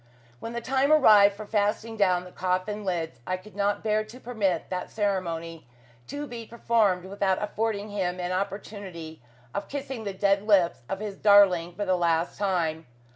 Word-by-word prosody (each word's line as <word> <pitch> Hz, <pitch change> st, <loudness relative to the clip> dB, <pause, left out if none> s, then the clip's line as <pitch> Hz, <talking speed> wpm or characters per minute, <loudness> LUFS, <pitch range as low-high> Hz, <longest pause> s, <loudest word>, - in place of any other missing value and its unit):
When 230 Hz, -, -6 dB
the 235 Hz, -, -3 dB
time 270 Hz, +4 st, +1 dB
arrived 210 Hz, -9 st, +7 dB
for 215 Hz, +1 st, -8 dB
fastening 215 Hz, +2 st, -1 dB
down 185 Hz, -4 st, +2 dB
the 180 Hz, -, -12 dB
coffin 185 Hz, +4 st, -2 dB
lids, 170 Hz, -4 st, -3 dB
I 185 Hz, -, -1 dB
could 205 Hz, +3 st, -15 dB
not 205 Hz, 0 st, 0 dB
bear 215 Hz, 0 st, +1 dB
to 220 Hz, +4 st, -13 dB
permit 205 Hz, -10 st, -2 dB
that 180 Hz, -1 st, -3 dB
ceremony 170 Hz, -, -3 dB, 0.4 s
to 290 Hz, +2 st, -5 dB
be 235 Hz, -4 st, -8 dB
performed 220 Hz, -6 st, +1 dB
without 190 Hz, -1 st, 0 dB
affording 210 Hz, 0 st, -2 dB
him 185 Hz, -3 st, -2 dB
an 180 Hz, 0 st, -2 dB
opportunity 185 Hz, -, -5 dB, 0.3 s
of 200 Hz, -, -4 dB
kissing 270 Hz, -4 st, -5 dB
the 200 Hz, -, -3 dB
dead 200 Hz, +1 st, +2 dB
lips 195 Hz, -9 st, +3 dB
of 195 Hz, +1 st, -3 dB
his 205 Hz, -2 st, -5 dB
darling 185 Hz, -5 st, +5 dB
for 205 Hz, -, -3 dB
the 185 Hz, -1 st, +2 dB
last 170 Hz, -1 st, 0 dB
time. 165 Hz, -6 st, -1 dB
200 Hz, 175 wpm, -27 LUFS, 180-215 Hz, 0.4 s, arrived